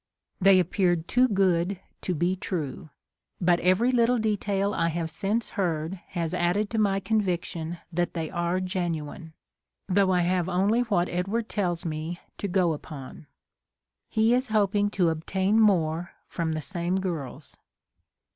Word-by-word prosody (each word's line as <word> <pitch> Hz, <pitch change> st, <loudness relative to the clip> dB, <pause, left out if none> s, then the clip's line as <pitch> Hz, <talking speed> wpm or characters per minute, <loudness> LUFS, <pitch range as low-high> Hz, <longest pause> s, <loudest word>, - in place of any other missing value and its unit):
They 195 Hz, -1 st, +6 dB
appeared 175 Hz, -1 st, +1 dB
too 250 Hz, +1 st, +4 dB
good 190 Hz, -3 st, +1 dB, 0.2 s
to 180 Hz, -, -2 dB
be 175 Hz, +4 st, +1 dB
true! 160 Hz, -4 st, -4 dB, 0.5 s
But 175 Hz, -1 st, +3 dB
every 185 Hz, +8 st, +3 dB
little 245 Hz, 0 st, +3 dB
detail 205 Hz, -2 st, 0 dB
I 165 Hz, -, +1 dB
have 165 Hz, 0 st, -2 dB
since 205 Hz, +7 st, -1 dB
heard 170 Hz, -2 st, -2 dB
has 170 Hz, -2 st, -2 dB
added 180 Hz, +4 st, +1 dB
to 225 Hz, -, 0 dB
my 195 Hz, -2 st, +2 dB
conviction 175 Hz, -5 st, -1 dB, 0.2 s
that 175 Hz, +1 st, -1 dB
they 160 Hz, -2 st, -3 dB
are 175 Hz, 0 st, 0 dB
genuine; 170 Hz, -4 st, -4 dB, 0.5 s
though 195 Hz, 0 st, +3 dB
I 180 Hz, -1 st, +3 dB
have 180 Hz, 0 st, +1 dB
only 195 Hz, +6 st, +2 dB
what 200 Hz, -7 st, +1 dB
Edward 200 Hz, +6 st, -2 dB
tells 175 Hz, -5 st, -1 dB
me 160 Hz, +2 st, -4 dB, 0.2 s
to 200 Hz, -, -2 dB
go 180 Hz, -3 st, +2 dB
upon. 145 Hz, -1 st, -9 dB, 0.8 s
He 220 Hz, +1 st, +3 dB
is 255 Hz, +2 st, +1 dB
hoping 205 Hz, -1 st, +2 dB
to 180 Hz, -4 st, +2 dB
obtain 190 Hz, +6 st, +1 dB
more 175 Hz, -5 st, +2 dB
from 165 Hz, -2 st, -2 dB
the 155 Hz, -, -3 dB
same 175 Hz, +4 st, -2 dB
girls. 170 Hz, -9 st, -4 dB
180 Hz, 145 wpm, -26 LUFS, 170-200 Hz, 0.8 s, They